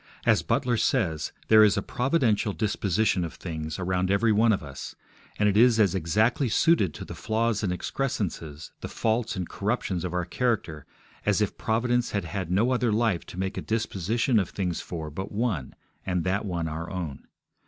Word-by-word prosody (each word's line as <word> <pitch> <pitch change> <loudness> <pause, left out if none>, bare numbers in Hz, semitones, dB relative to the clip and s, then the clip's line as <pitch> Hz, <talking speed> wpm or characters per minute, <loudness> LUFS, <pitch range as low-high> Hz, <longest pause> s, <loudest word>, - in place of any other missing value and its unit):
As - - +4
Butler 125 -2 +1
says, 80 -8 0 0.2
there 110 -1 +8
is 105 0 +4
'a 100 - 0
providential 125 -6 +1
disposition 105 -2 +1
of 85 - -5
things' 80 -3 -5
around 90 0 0
every 100 +3 +3
one 110 +2 +4
of 100 - 0
us, 70 -2 -8 0.4
and 105 - +3
it 100 - +2
is 115 +1 +5
as 100 -5 +4
exactly 110 - +1
suited 110 - +3
to - - -7
the - - -8
flaws 110 0 0
and 95 - 0
excrescences, 90 - -3
the - - -4
faults 115 +1 -1
and 90 -3 -3
corruptions 100 -4 -2
of 90 - -3
our 90 -1 -1
character 90 - -2 0.4
as - - +2
if - - 0
Providence 120 +2 0
had 100 -3 -1
had 95 0 -4
no 105 +8 +2
other 125 -2 +1
life 110 -5 +1
to - - -10
make 95 0 -2
a - - -4
disposition 110 +2 0
of 95 - -1
things 90 -4 -2
for 80 -3 -6
but 95 +6 -5
one, 105 - -2 0.3
and 90 -3 -1
that 95 +4 0
one 85 -4 -2
our 80 +2 -5
own. 85 -7 -5
100 Hz, 185 wpm, -27 LUFS, 90-115 Hz, 0.4 s, there